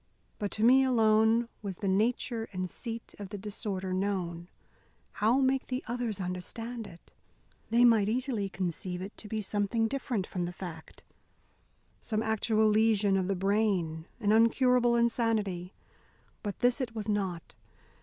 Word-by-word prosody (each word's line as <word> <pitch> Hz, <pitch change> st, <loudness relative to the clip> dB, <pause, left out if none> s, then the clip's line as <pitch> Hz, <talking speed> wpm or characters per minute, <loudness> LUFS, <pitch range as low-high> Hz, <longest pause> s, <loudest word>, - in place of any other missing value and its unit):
But 205 Hz, -, -1 dB
to 215 Hz, -, -2 dB
me 260 Hz, +3 st, +7 dB
alone 225 Hz, -2 st, +4 dB
was 195 Hz, -4 st, -5 dB
the 200 Hz, -, -3 dB
nature 225 Hz, +3 st, 0 dB
and 185 Hz, -1 st, -3 dB
seat 230 Hz, +4 st, -7 dB
of 200 Hz, -2 st, -7 dB
the 205 Hz, -, -6 dB
disorder 195 Hz, -2 st, -4 dB
known. 180 Hz, -3 st, -2 dB, 0.6 s
How 230 Hz, +5 st, +2 dB
make 265 Hz, 0 st, +1 dB
the 255 Hz, +1 st, -3 dB
others 235 Hz, -4 st, -3 dB
understand 215 Hz, +6 st, -5 dB
it? 175 Hz, -3 st, -16 dB, 0.6 s
They 235 Hz, +2 st, +5 dB
might 220 Hz, -4 st, +5 dB
easily 235 Hz, -4 st, -1 dB
conceive 180 Hz, -1 st, -2 dB
it 200 Hz, -, -8 dB
to 215 Hz, -, -10 dB
be 220 Hz, +1 st, -2 dB
something 210 Hz, +3 st, 0 dB
different 240 Hz, -6 st, -2 dB
from 180 Hz, -3 st, -3 dB
the 175 Hz, -, -4 dB
fact, 170 Hz, -4 st, -9 dB, 1.0 s
some 215 Hz, -1 st, -1 dB
actual 220 Hz, 0 st, +2 dB
lesion 215 Hz, -2 st, +3 dB
of 190 Hz, -1 st, +1 dB
the 195 Hz, -, 0 dB
brain, 190 Hz, -5 st, 0 dB
an 210 Hz, -3 st, +1 dB
incurable 240 Hz, +2 st, +4 dB
insanity. 220 Hz, -6 st, 0 dB, 0.7 s
But 205 Hz, -2 st, -5 dB
this 245 Hz, +3 st, +3 dB
it 230 Hz, -3 st, -4 dB
was 215 Hz, -1 st, -4 dB
not. 195 Hz, -5 st, -2 dB
215 Hz, 150 wpm, -30 LUFS, 190-230 Hz, 1.0 s, me